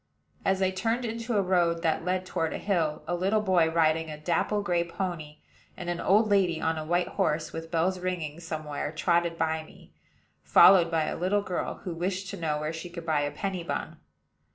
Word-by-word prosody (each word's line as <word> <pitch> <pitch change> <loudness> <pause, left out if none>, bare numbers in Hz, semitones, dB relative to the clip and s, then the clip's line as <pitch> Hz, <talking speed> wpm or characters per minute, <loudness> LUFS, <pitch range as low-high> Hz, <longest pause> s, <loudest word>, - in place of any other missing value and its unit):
As 195 0 +1
I 190 - +2
turned 225 +6 -1
into 230 0 -2
a 200 - +3
road 175 -2 +1
that 160 0 +1
led 185 +1 -1
toward 165 -3 -2
a - - -3
hill, 165 -7 -1
a 175 - -1
little 190 +5 +1
boy, 185 -6 +3
riding 160 -1 +2
a 150 - -6
dapple 180 +6 0
gray 175 -3 +1
pony, 170 -4 -5 0.4
and 175 -1 -3
an 175 - -3
old 215 +3 +4
lady 190 -5 +2
on 160 0 0
a - - -4
white 175 +3 0
horse, 155 +1 -1
with 165 0 -6
bells 180 +3 0
ringing 170 -4 -3
somewhere, 155 -3 -4
trotted 170 +1 +1
by 160 -1 0
me, 155 - -17 0.5
followed 180 -3 +7
by 165 -1 +1
a - - -2
little 195 +3 0
girl, 185 -2 -4
who 180 - -4
wished 185 +2 -3
to - - -6
know 150 -2 0
where 155 +1 -3
she 165 +2 -7
could 170 -1 -8
buy 155 -3 +1
a 145 - 0
penny 190 +2 -3
bun. - - -4
170 Hz, 205 wpm, -28 LUFS, 160-185 Hz, 0.5 s, followed